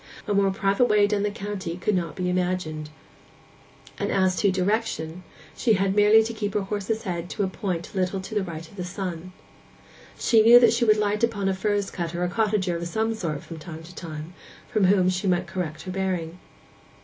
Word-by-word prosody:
A 205 - +1
more 200 -1 +3
private 195 +4 +2
way 210 -3 +4
down 205 0 0
the 205 - +1
county 200 -4 -5
could 200 +4 0
not 170 -3 -2
be 180 -1 -2
imagined; 180 -4 -1 1.1
and - - -1
as 190 -1 +2
to 200 - +3
direction, 185 -3 -1 0.3
she 230 - +2
had 195 -1 +1
merely 210 +1 +6
to 230 +1 -4
keep 205 -2 -3
her 210 - +2
horse's 210 +2 -3
head 175 -3 -4
to - - -2
a - - +1
point 180 -2 -4
a - - -6
little 185 +1 0
to 190 +4 -8
the 210 - +1
right 165 -3 -6
of 200 - -17
the 180 - -3
sun. 180 -1 -5 0.9
She 225 -2 +4
knew 235 +2 +9
that 240 - +5
she 235 +1 +2
would 215 -1 +5
light 210 +1 0
upon 205 -4 +1
a 195 - +2
furze 205 +1 -1
cutter 175 0 -3
or - - +1
cottager 205 -3 0
of 170 0 -3
some 220 +5 0
sort 165 -9 -4
from 165 -1 -9
time 160 0 -9
to 175 +3 -12
time, 160 -1 -7 0.3
from 215 -3 +2
whom 185 -1 +4
she 185 +2 0
might 180 0 +2
correct 170 -3 -5
her 185 - -5
bearing. 180 -3 -2
190 Hz, 210 wpm, -25 LUFS, 175-210 Hz, 1.1 s, knew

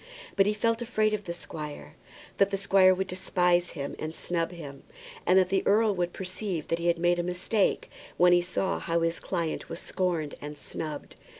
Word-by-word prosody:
But 195 0 +4
he 210 - +1
felt 230 +2 +1
afraid 215 -2 +1
of 210 -1 -2
the 170 - -3
squire, 150 - -7 0.5
that 200 - +5
the 195 - -1
squire 195 -1 +5
would 190 +1 0
despise 180 -1 +1
him 140 0 -4
and 155 +1 -4
snub 170 -1 -2
him, 145 -6 -9 0.5
and 185 - +6
that 185 - +4
the 195 - +2
earl 215 +1 +4
would 175 -2 -1
perceive 185 -3 -4
that 165 - 0
he 170 - -1
had 170 0 +3
made 175 +1 +2
a - - +3
mistake 180 +4 0 0.3
when 175 0 +6
he 175 - +5
saw 185 +2 -1
how 170 0 0
his 165 0 0
client 165 -2 -3
was 165 - -4
scorned 170 -5 -2
and 150 0 -7
snubbed. 150 0 -7
180 Hz, 200 wpm, -28 LUFS, 165-195 Hz, 0.5 s, and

